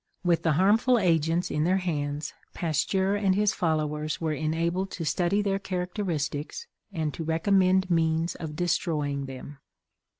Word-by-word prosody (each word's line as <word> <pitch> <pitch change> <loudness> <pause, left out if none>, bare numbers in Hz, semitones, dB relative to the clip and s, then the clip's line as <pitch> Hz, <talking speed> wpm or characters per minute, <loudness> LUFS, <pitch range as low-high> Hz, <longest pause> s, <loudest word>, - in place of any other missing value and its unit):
With 175 -2 +2
the 160 - +2
harmful 215 - +4
agents 165 -3 +1
in 150 - 0
their 185 +3 +3
hands, 150 -4 -3 0.2
Pasteur 190 +4 0
and 195 -2 +2
his 210 +1 +2
followers 155 -3 -1
were 160 -2 -1
enabled 165 +5 -1
to 165 - -4
study 180 +6 +1
their 195 -1 0
characteristics 180 - -3 0.3
and 160 -5 -2
to 165 - -5
recommend 185 +3 +2
means 165 0 +1
of 155 -3 -7
destroying 150 -5 -1
them. 135 +2 -9
170 Hz, 140 wpm, -27 LUFS, 155-190 Hz, 0.3 s, harmful